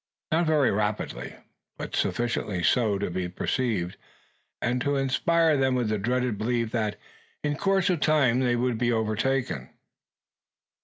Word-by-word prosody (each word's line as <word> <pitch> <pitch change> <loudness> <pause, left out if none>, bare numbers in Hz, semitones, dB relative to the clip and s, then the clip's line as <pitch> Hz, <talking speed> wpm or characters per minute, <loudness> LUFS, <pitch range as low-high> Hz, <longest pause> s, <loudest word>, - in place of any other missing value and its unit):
Not 165 +1 +2
very 150 -5 +3
rapidly, 105 - -2 0.4
but - - -5
sufficiently 110 -6 -1
so 110 0 +3
to 100 -2 -3
be 90 0 -2
perceived, 95 -2 -1 0.6
and 125 +1 0
to 145 +2 +1
inspire 155 +4 +2
them 130 -1 +2
with 120 -4 0
the 105 -1 0
dread 125 0 0
belief, 115 0 0
that 110 -3 -1 0.4
in 145 0 0
course 195 +2 +1
of 175 - 0
time 140 -6 +3
they 125 -2 +2
would 120 -1 0
be 120 0 +2
overtaken. 115 +4 -1
120 Hz, 145 wpm, -26 LUFS, 110-135 Hz, 0.6 s, very